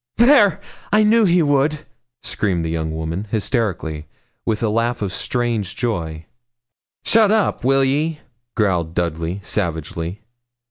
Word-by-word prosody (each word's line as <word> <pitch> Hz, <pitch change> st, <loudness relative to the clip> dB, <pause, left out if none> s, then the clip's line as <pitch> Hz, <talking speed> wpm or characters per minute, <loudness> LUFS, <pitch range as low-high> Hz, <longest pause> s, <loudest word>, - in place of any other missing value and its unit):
'There! 235 Hz, -, +5 dB, 0.3 s
I 215 Hz, +1 st, +5 dB
knew 220 Hz, +1 st, +4 dB
he 175 Hz, -2 st, +4 dB
would,' 145 Hz, +1 st, +1 dB, 0.4 s
screamed 90 Hz, -5 st, -1 dB
the 80 Hz, -, -2 dB
young 80 Hz, -1 st, -2 dB
woman, 80 Hz, +6 st, -4 dB
hysterically, 100 Hz, -, -2 dB, 0.4 s
with 110 Hz, 0 st, 0 dB
a 110 Hz, -, +2 dB
laugh 115 Hz, +1 st, 0 dB
of 95 Hz, -2 st, -3 dB
strange 110 Hz, -3 st, -2 dB
joy. 85 Hz, -10 st, -3 dB, 0.8 s
'Shut 220 Hz, -2 st, +4 dB
up, 215 Hz, -, +1 dB
will 135 Hz, +1 st, +3 dB
ye?' 150 Hz, +4 st, 0 dB, 0.4 s
growled 90 Hz, -6 st, 0 dB
Dudley, 85 Hz, +2 st, -2 dB
savagely. 85 Hz, 0 st, -3 dB
110 Hz, 130 wpm, -20 LUFS, -, 0.8 s, There